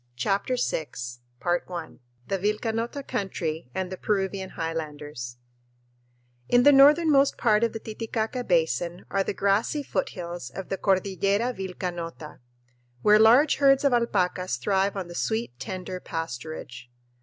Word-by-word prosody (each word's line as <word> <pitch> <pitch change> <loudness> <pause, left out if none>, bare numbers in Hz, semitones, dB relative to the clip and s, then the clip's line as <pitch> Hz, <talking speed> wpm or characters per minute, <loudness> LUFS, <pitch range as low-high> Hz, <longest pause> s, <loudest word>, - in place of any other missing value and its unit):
CHAPTER 195 - 0
VI 160 -10 -1 0.6
The 170 -5 -3
Vilcanota 225 +6 -1
Country 170 - -3
and 190 -1 -2
the 185 - -5
Peruvian 195 -2 -1
Highlanders 150 -6 -5 1.1
In 245 0 +5
the 290 - +8
northernmost 285 0 +6
part 215 -2 +3
of 230 - +2
the 225 - -5
Titicaca 225 +2 -3
Basin 170 0 0
are 195 0 +2
the 195 - -3
grassy 205 +9 +1
foothills 175 - -4
of 190 +7 -8
the 195 - -1
Cordillera 200 +4 +1
Vilcanota, 175 -5 -6 0.6
where 210 0 +6
large 245 +7 +6
herds 275 -1 +5
of 280 -3 +3
alpacas 185 -6 +1
thrive 195 0 +1
on 190 -3 -4
the 175 - -9
sweet, 195 - -2
tender 185 +5 -5
pasturage. 155 -6 -6
195 Hz, 125 wpm, -26 LUFS, 170-225 Hz, 1.1 s, the